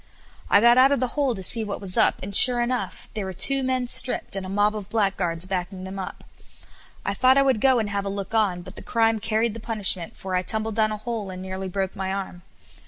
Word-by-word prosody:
I 200 - +5
got 240 +2 +5
out 265 +2 +5
of 280 - +1
the 255 0 -1
hole 275 -3 -1
to 190 - -5
see 225 +4 +3
what 205 -2 -5
was 190 -3 -4
up, - - +2
and 200 +1 -3
sure 245 +1 +8
enough 245 +1 -3
there 215 - -4
were 190 -1 -6
two 270 +9 +4
men 255 -1 -1
stripped, 245 -3 +1
and 195 - -4
a 185 - -7
mob 205 +2 +1
of 205 -2 -7
blackguards 185 -6 -1
backing 185 0 -5
them 190 +1 -7
up. 190 - -8 0.8
I 200 - -1
thought 255 +5 +3
I 275 - +5
would 260 -6 0
go 260 -2 +4
and 220 -2 -1
have 200 0 -3
a - - -3
look 200 +2 -6
on, 195 -6 0
but - - -12
the - - -7
crime 225 -1 0
carried 225 +1 -1
the 230 - -8
punishment, 210 -2 -1
for 190 -1 -7
I 180 - +1
tumbled 220 +3 -1
down 215 0 +1
a 215 - -4
hole 215 -2 -5
and 185 0 -8
nearly 190 0 -6
broke 190 +1 -4
my 190 -1 -4
arm. 190 -2 -6
210 Hz, 250 wpm, -23 LUFS, 190-235 Hz, 0.8 s, sure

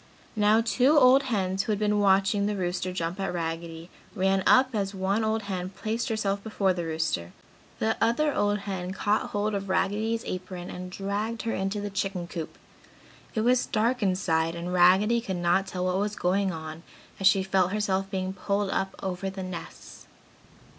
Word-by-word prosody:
Now, 215 +1 +4
two 255 +6 +3
old 260 0 +7
hens 190 -3 0
who 215 - -2
had 210 - +1
been 210 0 +1
watching 200 +1 +3
the 210 - -1
rooster 180 -1 -2
jump 175 +1 -3
at 195 - -1
Raggedy 165 0 -5 0.2
ran 195 -1 +2
up 260 0 +5
and 210 - +1
as 195 0 -4
one 195 +3 0
old 220 0 0
hen 185 -2 -4
placed 220 +5 -3
herself 200 -3 -1
before 200 -4 +1
the 175 -2 -4
rooster, 160 - -2 0.4
the 110 0 0
other 280 +6 +2
old 205 0 +1
hen 190 -2 -4
caught 205 +2 0
hold 210 +1 -1
of 195 -1 -3
Raggedy's 215 +5 0
apron 185 -1 -6
and 180 0 -7
dragged 205 +4 -3
her 225 - -1
into 195 +2 -2
the 205 0 -4
chicken 195 -2 -2
coop. 165 -2 -6 0.8
It 220 - +1
was 250 +2 +2
dark 235 +3 +1
inside 170 -4 +1
and 175 +1 -4
Raggedy 190 +6 +5
could 190 -5 -4
not 175 +2 +2
tell 180 -1 -3
what 185 +1 +1
was 205 +1 -1
going 190 +1 +1
on 160 -1 -7 0.4
as 195 - +4
she 195 0 +4
felt 190 -1 +1
herself 195 -2 0
being 190 -1 -2
pulled 200 +1 -1
up 195 0 -2
over 190 0 -3
the 190 0 -6
nests. 185 -2 -9
195 Hz, 185 wpm, -27 LUFS, 180-210 Hz, 0.8 s, old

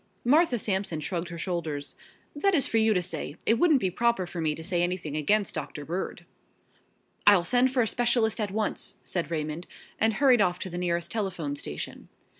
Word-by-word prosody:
Martha 290 0 +4
Sampson 190 -6 -1
shrugged 175 +2 -3
her 170 - -7
shoulders. 165 -5 -3 0.4
"That 390 +6 +2
is 275 - +3
for 225 - +1
you 220 -1 +3
to 180 - +1
say. 160 -4 -5
It 225 +1 +3
wouldn't 315 -6 +5
be 190 -5 0
proper 235 -1 +1
for 175 -1 -5
me 155 -1 0
to 160 - -8
say 175 0 0
anything 175 -4 -2
against 200 +7 +1
Doctor 145 -2 -5
Bird." 175 +5 -4 1.0
"I'll 200 -4 +7
send 250 +6 +3
for 255 -2 +2
a - - -1
specialist 235 -2 +2
at 210 - -1
once," 210 +2 -2
said 175 -3 -2
Raymond, 155 +1 -3 0.3
and 220 +1 +3
hurried 255 -4 +5
off 180 -2 +2
to 185 - -6
the 175 - -4
nearest 170 -1 -1
telephone 180 -9 -2
station. 75 - -6
185 Hz, 195 wpm, -27 LUFS, 170-225 Hz, 1.0 s, I'll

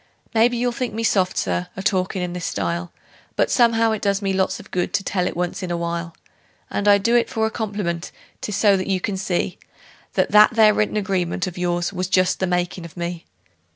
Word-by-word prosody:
Maybe 235 +2 +3
you'll 245 +1 +1
think 240 -2 -4
me 225 - -2
soft, 190 -4 +1
Sir, 90 -1 -1
a 195 - -4
talkin' 185 -1 0
in 175 -1 -3
this 180 -1 -4
style, 85 -2 -2 0.4
But - - +1
somehow 230 -2 +4
it 220 - -2
does 200 -1 +1
me 195 -2 -1
lots 190 0 0
of - - -14
good 180 +2 -1
to 205 -1 0
tell 180 -1 0
it - - -4
once 180 +3 -2
in 185 - -4
a 175 - -1
while; 170 0 -3 0.6
And 205 - -1
I 205 0 +7
do 230 +4 +1
it 240 - +3
for 220 -1 0
a 220 - -1
compliment 200 -7 -3 0.3
'tis 210 - -3
so 205 -1 +4
that 185 - -3
you 190 -1 +1
can 200 +1 -2
see 185 -1 -2 0.5
That - - +1
that 210 +2 +6
there 215 -2 +6
written 215 0 0
agreement 190 -3 -1
of 180 -2 -6
yours 175 +1 -1
was 185 -1 -2
just 185 -1 +2
the 190 - 0
makin' 180 0 -1
of 170 +1 -11
me. 170 0 -5
190 Hz, 225 wpm, -22 LUFS, 175-210 Hz, 0.6 s, I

